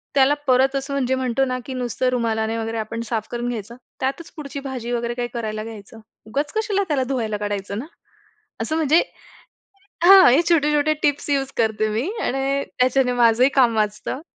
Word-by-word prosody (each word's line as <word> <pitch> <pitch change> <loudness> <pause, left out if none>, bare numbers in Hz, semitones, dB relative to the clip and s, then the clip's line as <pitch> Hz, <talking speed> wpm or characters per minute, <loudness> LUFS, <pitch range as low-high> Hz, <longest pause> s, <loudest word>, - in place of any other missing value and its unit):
त्याला 275 +1 +5
परत 265 +1 +3
असं 275 +1 -3
म्हणजे 260 -1 0
म्हणतो 260 0 0
ना 255 -1 -2
की 265 - -6
नुसतं 255 0 -1
रुमालाने 225 -2 -1
वगैरे 225 0 -3
आपण 220 +1 -4
साफ 220 -2 -2
करून 240 0 -3
घ्यायचं, 230 -1 -6 0.2
त्यातच 275 +5 -3
पुढची 280 -1 -6
भाजी 250 -3 -5
वगैरे 235 0 -1
काही 240 0 -3
करायला 215 -2 -4
घ्यायचं. 225 0 -10 0.3
उगाच 285 +7 -2
कशाला 410 -2 0
त्याला 280 -4 +1
धुवायला 225 -5 -1
काढायचं 205 -1 -4
ना? 255 - -6 0.8
असं 315 - -2
म्हणजे 320 +1 +4 1.0
हां. 385 -3 +9
हे 280 - +5
छोटे-छोटे 300 -1 +3
टिप्स 290 0 0
यूज 275 -1 0
करते 220 -1 +1
मी. 235 - -1
आणि 270 +1 0 0.2
त्याच्याने 255 0 +3
माझंही 235 +3 +5
काम 245 -4 +4
वाचतं. 215 +6 -2
255 Hz, 170 wpm, -22 LUFS, 225-275 Hz, 1.0 s, हां